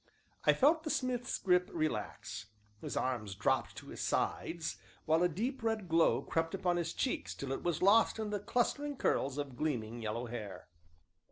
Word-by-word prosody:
I - - +7
felt 310 +4 +4
the 315 - -4
smith's 250 -3 -1
grip 180 -1 +3
relax, 135 - -3 0.3
his - - -4
arms 110 -7 -1
dropped 105 - +1
to - - -10
his - - -6
sides, 165 -1 -1 0.3
while 160 +1 +3
a 180 - +4
deep, 235 - -2
red 225 -4 -1
glow 165 0 +3
crept 165 +2 -1
up 180 -2 +1
his 170 -1 -1
cheeks 260 - -1
till 135 -1 -5
it 135 - -2
was 175 -1 -1
lost 215 +4 +5
in 215 -1 -3
the 205 - -1
clustering 280 +7 0
curls 140 - +1
of 140 -3 -4
gleaming, 120 -5 -2
yellow 115 +2 -2
hair. 110 -4 -7
170 Hz, 175 wpm, -34 LUFS, -, 0.3 s, I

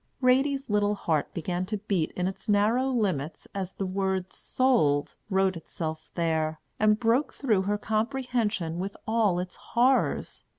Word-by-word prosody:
Ratie's 270 +2 +2
little 205 0 +2
heart 160 -7 -1
began 175 +2 -2
to 215 - -2
beat 195 -5 -1
in 180 0 -1
its 190 +3 -7
narrow 220 +6 +3
limits 185 - -1
as 190 -2 -4
the 195 - -3
word 190 -1 -1
"sold" 155 - +1
wrote 190 -1 +2
itself 160 -1 -6
there, 160 -2 0 0.2
and 215 0 +4
broke 245 +5 +2
through 220 -8 +2
her 210 - +2
comprehension 220 -6 -1
with 195 +2 -4
all 220 -5 +2
its 180 0 -4
horrors. 255 +3 +1
200 Hz, 145 wpm, -27 LUFS, 175-230 Hz, 0.2 s, and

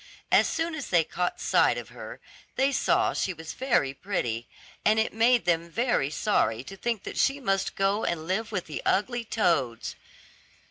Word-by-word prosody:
As - - +5
soon 330 0 -1
as 285 -3 -5
they 170 -2 +4
caught 180 +3 -2
sight - - +3
of - - -7
her, - - -9 0.4
they 270 +1 +2
saw - - +2
she 185 - -1
was 160 0 -8
very 235 - +1
pretty, 125 - -3 0.4
and 215 +1 +4
it 220 - +1
made 235 +1 +3
them 170 -1 +1
very 230 - +1
sorry 125 - +1
to 195 - -9
think 225 +1 -2
that - - -5
she 275 +1 +2
must 195 -7 -1
go 195 +2 +1
and 160 -2 -2
live 215 +6 -2
with 185 -5 -2
the 155 - -5
ugly 240 +4 +1
toads. 165 - 0
195 Hz, 180 wpm, -27 LUFS, 165-235 Hz, 0.4 s, As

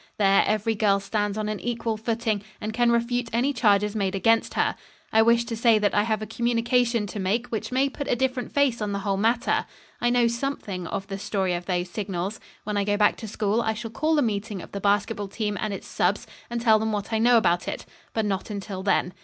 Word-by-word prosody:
There 195 -1 +4
every 215 +1 +1
girl 205 -2 +2
stands 205 +1 -2
on 215 -1 -2
an 215 -1 -3
equal 230 -1 -2
footing 220 -1 -1 0.2
and 215 +1 -4
can 240 +1 +3
refute 235 0 0
any 245 +5 +1
charges 210 -3 +2
made 195 -2 0
against 225 +4 +2
her. - - +1 0.4
I 220 - +6
wish 235 +1 +4
to 230 - -4
say 230 0 +4
that 210 -1 +1
I 205 - +4
have 215 0 -1
a - - -3
communication 235 0 +1
to 205 +1 -6
make 205 +6 0
which 225 +1 -4
may 265 +2 +2
put 280 0 -6
a 250 - +2
different 255 0 -1
face 275 -5 +2
on 205 -1 -1
the - - -1
whole 200 -1 +1
matter. 225 +4 +1 0.4
I 240 - +3
know 240 -1 +3
something 235 -7 -3
of 195 +3 -4
the 195 0 -6
story 190 -2 -1
of 175 0 -4
those 180 -1 0
signals. 195 0 -3 0.2
When 210 0 -2
I 200 - +2
go 205 +1 0
back 210 0 +4
to 220 - -7
school 215 +2 0
I 220 -1 -1
shall 225 +1 -6
call 310 +6 +1
a 290 - +4
meeting 210 -2 -2
of - - -10
the 200 - -5
basketball 205 +1 +1
team 210 +1 -3
and 215 - -1
its 195 - -6
subs. - - 0 0.2
and 235 0 -2
tell 220 -2 +4
them 220 0 -1
what 210 +1 -3
I 220 - +2
know 240 +1 +5
about 175 -5 +2
it; - - -4 0.3
but 220 -1 -1
not 195 0 -2
until 200 -2 -5
then. 190 -2 +1
215 Hz, 235 wpm, -25 LUFS, 200-235 Hz, 0.4 s, I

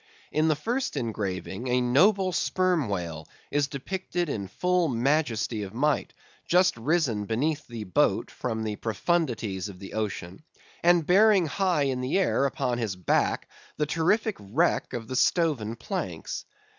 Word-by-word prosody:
In 155 +1 +2
the 155 - +3
first 240 - -2
engraving 105 -2 -3
a 125 0 +2
noble 185 - +3
Sperm 180 - +1
Whale 85 -5 -4 0.2
is 145 -1 +2
depicted 175 +4 -3
in 100 -7 -3
full 180 - +1
majesty 120 -4 0
of 100 +1 -7
might, 145 +2 0 0.3
just 180 +1 +4
risen 120 -4 0
beneath 145 +8 -1
the 115 -3 -6
boat 90 -4 +1
from 110 -3 -3
the 105 -1 -3
profundities 110 - -1
of 95 - -10
the 95 +1 -10
ocean, 100 - -4 0.4
and 175 -2 +4
bearing 195 +1 +5
high 175 -1 +1
in 130 -2 -1
the 130 +8 0
air 185 -7 +2
upon 125 -2 -1
his 110 -5 -2
back 90 -3 0 0.3
the 150 - +1
terrific 195 +8 +1
wreck 130 - 0
of 115 -2 -4
the 130 - -4
stoven 130 -8 +2
planks. 115 - -4
135 Hz, 150 wpm, -27 LUFS, 110-170 Hz, 0.4 s, bearing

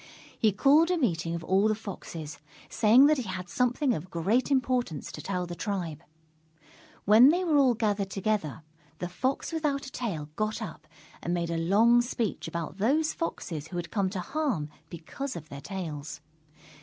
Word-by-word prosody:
He 220 -3 +4
called 285 - +4
a 360 - +2
meeting 170 - 0
of 170 - -5
all 190 +4 +3
the 215 - +2
Foxes, 165 -8 -8 0.3
saying 230 +5 +6
that 305 +1 +4
he 230 -7 -4
had 185 -1 -5
something 250 - +1
of 180 -1 -5
great 200 - +1
importance 250 - 0
to - - -8
tell 180 -2 -2
the 175 - -6
tribe. 175 -5 -3 1.0
When 220 +6 +8
they 350 +4 +2
were 320 -4 +3
all 260 -3 +4
gathered 205 -3 0
together, 195 -6 -2 0.3
the 180 - -3
Fox 255 - -2
Without 295 -4 -1
a 265 - -9
Tail 170 -12 -4
got 215 +1 -1
up 165 -8 -8 0.3
and 175 +1 -1
made 170 -1 -2
a - - -1
long 220 +8 +5
speech 235 -6 -3
about 170 +2 -5
those 300 +9 +2
Foxes 160 - -4
who 175 - -6
had 170 -1 -5
come 195 -3 +1
to 185 -1 -4
harm 225 - -2 0.2
because 250 - -6
of 160 -3 -8
their 140 0 -8
tails. 155 -5 -6
200 Hz, 180 wpm, -28 LUFS, 170-250 Hz, 1.0 s, When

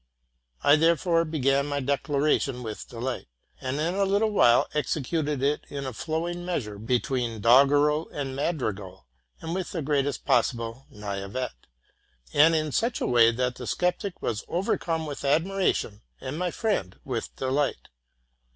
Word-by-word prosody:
I 145 +2 +6
therefore 165 +1 +3
began 140 -3 +1
my 145 -1 -1
declaration 140 -1 0
with 110 -2 -7
delight, 125 +2 -4 0.3
and 130 +2 -2
in 165 +3 0
a 200 +1 +1
little 200 +3 +2
while 120 - +5
executed 150 -1 -1
it 145 +2 +1
in 140 -1 -5
a 130 - -4
flowing 170 +6 -3
measure, 115 - -3
between 120 0 -1
doggerel 145 +7 +4
and 135 -2 -4
madrigal, 105 - -3 0.4
with 175 +3 -3
the 165 -4 -2
greatest 140 -3 0
possible 120 +1 0
naiveté, 100 +4 -4 0.8
and 160 +3 +6
in 155 -1 0
such 230 - 0
a - - -1
way 120 -2 +5
that 125 +1 -1
the 125 - -7
sceptic 180 +2 -1
was 110 -2 -2
overcome 165 -2 -1
with 145 -2 -6
admiration, 160 - +1 0.2
and 135 +4 -5
my 180 0 0
friend 170 - -2
with 120 -4 -4
delight. 135 +2 -1
140 Hz, 140 wpm, -26 LUFS, 125-165 Hz, 0.8 s, I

